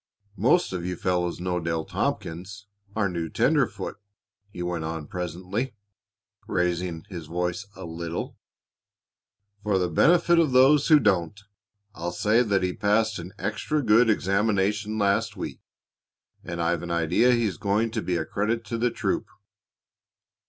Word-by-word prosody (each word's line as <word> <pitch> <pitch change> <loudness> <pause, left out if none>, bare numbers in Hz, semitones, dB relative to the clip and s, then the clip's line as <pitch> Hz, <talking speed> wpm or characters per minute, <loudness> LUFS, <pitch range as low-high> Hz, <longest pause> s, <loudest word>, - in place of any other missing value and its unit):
"Most 125 - +3
of 90 -2 -3
you 90 +1 -3
fellows 90 -1 -1
know 90 0 -1
Dale 80 -1 -2
Tompkins, 95 +5 -3 0.3
our 110 -2 +2
new 85 -3 -3
tenderfoot," - - 0 0.5
he 90 -3 -6
went 90 -2 -2
on 80 -1 -4
presently, 90 - -4 0.7
raising 90 -2 -1
his 85 -5 -7
voice 90 +4 -2
a 95 - -8
little. 85 0 -5 1.3
"For 105 -2 +1
the 90 -1 0
benefit 170 - +4
of 155 -6 +2
those 135 +3 +6
who 155 -2 +7
don't, 95 - +1 0.5
I'll 85 -3 -4
say 105 +6 +2
that 100 -5 +1
he 90 0 0
passed 110 0 +1
an 90 +2 -8
extra 125 +9 -1
good 115 +1 +5
examination 105 +1 +1
last 105 +1 +1
week, - - -6 0.8
and 85 0 -5
I've 85 0 0
an 85 - -6
idea 85 +9 +3
he's 110 -8 0
going 105 +5 0
to 110 -1 -2
be 90 -3 -1
a 80 - -2
credit 115 +3 -1
to 115 - -3
the 120 +1 +2
troop. - - -2
95 Hz, 145 wpm, -26 LUFS, 85-110 Hz, 1.3 s, who